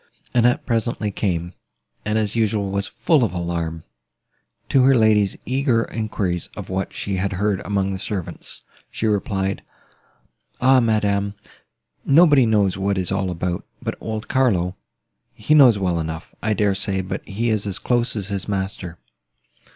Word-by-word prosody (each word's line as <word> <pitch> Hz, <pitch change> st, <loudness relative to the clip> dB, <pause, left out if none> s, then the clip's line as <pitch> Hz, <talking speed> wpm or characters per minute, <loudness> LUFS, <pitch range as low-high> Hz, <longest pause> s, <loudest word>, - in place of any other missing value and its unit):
Annette 120 Hz, 0 st, +3 dB
presently 115 Hz, -3 st, -1 dB
came, 90 Hz, -3 st, -2 dB, 0.5 s
and, 105 Hz, +1 st, 0 dB
as 110 Hz, -1 st, -1 dB
usual, 105 Hz, -3 st, 0 dB
was 100 Hz, 0 st, -1 dB
full 155 Hz, -6 st, +2 dB
of 110 Hz, -, 0 dB
alarm; 85 Hz, -2 st, -3 dB, 0.9 s
to 135 Hz, -, +4 dB
her 135 Hz, +1 st, +5 dB
lady's 105 Hz, -4 st, +3 dB
eager 130 Hz, -3 st, +1 dB
enquiries 100 Hz, -6 st, -2 dB
of -, -, -7 dB
what 95 Hz, +1 st, -2 dB
she 100 Hz, -2 st, -3 dB
had 100 Hz, +2 st, -1 dB
heard 100 Hz, +1 st, 0 dB
among 100 Hz, -1 st, -1 dB
the 95 Hz, -, -4 dB
servants, 95 Hz, -3 st, -5 dB, 0.3 s
she -, -, -4 dB
replied: 100 Hz, -2 st, 0 dB, 1.0 s
"Ah, 130 Hz, +1 st, +5 dB
madam! 100 Hz, -3 st, +1 dB, 0.7 s
nobody 145 Hz, -4 st, +5 dB
knows 100 Hz, -4 st, +2 dB
what 100 Hz, 0 st, 0 dB
it -, -, +1 dB
is 90 Hz, -, -3 dB
all 95 Hz, -1 st, 0 dB
about, 90 Hz, 0 st, -3 dB, 0.2 s
but -, -, -3 dB
old 110 Hz, -1 st, -4 dB
Carlo; 95 Hz, -9 st, +1 dB, 0.6 s
he 110 Hz, +8 st, +1 dB
knows 130 Hz, -8 st, +7 dB
well 90 Hz, -3 st, 0 dB
enough, 80 Hz, 0 st, -5 dB
I 110 Hz, 0 st, +1 dB
dare 100 Hz, -1 st, +2 dB
say, 95 Hz, -1 st, -1 dB
but 95 Hz, +1 st, -5 dB
he 115 Hz, +4 st, -1 dB
is 105 Hz, -1 st, 0 dB
as 100 Hz, -1 st, -1 dB
close 120 Hz, +1 st, 0 dB
as 100 Hz, -2 st, -3 dB
his 100 Hz, -2 st, -2 dB
master. 95 Hz, -3 st, -4 dB
100 Hz, 160 wpm, -22 LUFS, 95-115 Hz, 1.0 s, knows